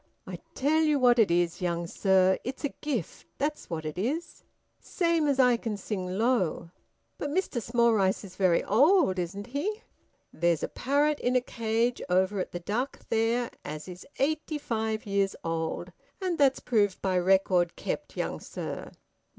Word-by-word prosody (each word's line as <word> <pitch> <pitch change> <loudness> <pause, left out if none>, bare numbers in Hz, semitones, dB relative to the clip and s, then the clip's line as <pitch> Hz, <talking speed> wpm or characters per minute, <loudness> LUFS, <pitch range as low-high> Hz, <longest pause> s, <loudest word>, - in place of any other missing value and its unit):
"I - - -7 0.2
tell 305 +4 +2
you 305 -2 +3
what 245 -2 +4
it 215 -5 +5
is, 170 0 +1
young 170 -1 -1
sir. 190 +1 +3
It's 260 +4 -6
a - - 0
gift, 260 - -4
that's 295 +2 -2
what 160 -2 -4
it 155 +3 -4
is, 290 - -3 0.4
same 335 -4 0
as 280 -2 +2
I 250 -2 +5
can 225 -3 -4
sing 185 -2 -4
low." 215 -8 0 0.5
"But 290 - -2
Mr 300 -6 -1
Smallrice 225 -5 +2
is 185 -2 -11
very 185 -3 +3
old, 275 - +4
isn't 195 +4 -4
he?" 325 - -3 0.5
"There's 170 -1 +1
a - - 0
parrot 290 +3 +1
in 250 +1 0
a - - +6
cage 230 0 -1
over 190 +2 +2
at 185 - -3
the 175 - -4
Duck, 235 +10 -3
there, 230 +2 +1
as 155 +2 -6
is 180 0 -9
eighty 305 +2 0
five 220 -4 -2
years 200 -1 0
old, 165 +2 -3 0.3
and 370 -3 -1
that's 275 -2 +4
proved 205 -5 +1
by 185 -2 +2
record 180 -1 +3
kept, - - -5
young - - -2
sir." - - -6
220 Hz, 165 wpm, -28 LUFS, 185-270 Hz, 0.5 s, a